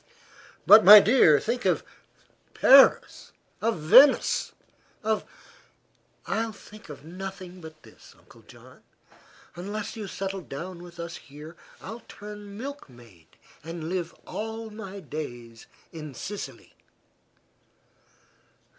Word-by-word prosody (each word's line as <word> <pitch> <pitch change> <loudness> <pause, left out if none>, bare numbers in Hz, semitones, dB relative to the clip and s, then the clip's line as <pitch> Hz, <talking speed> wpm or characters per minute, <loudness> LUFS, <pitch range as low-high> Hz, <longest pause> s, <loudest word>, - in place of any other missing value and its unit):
"But, 215 +1 +8
my 210 +2 +11
dear, 200 - +4
think 245 - -3
of - - 0 0.7
Paris, 270 +1 +4 0.3
of 230 -2 0
Venice, 255 - +4 0.5
of 220 0 -1 0.6
" - - -41
"I'll 225 0 -2
think 210 -2 -16
of 145 0 -11
nothing 185 +1 -9
but 160 -1 -13
this, - - -18
Uncle - - -20
John. - - -18 0.7
Unless 205 +5 -6
you 215 -3 -7
settle 195 0 -5
down 170 +4 -8
with 175 -1 -14
us 170 0 -7
here 150 +4 -13 0.3
I'll 225 +4 -9
turn 205 -1 -11
milkmaid 120 - -11 0.4
and 165 0 -7
live 175 -2 -4
all 220 0 -6
my 200 -2 -9
days 120 -9 -9 0.2
in 155 -4 -9
Sicily!" 205 - -8
190 Hz, 110 wpm, -26 LUFS, 160-215 Hz, 0.7 s, my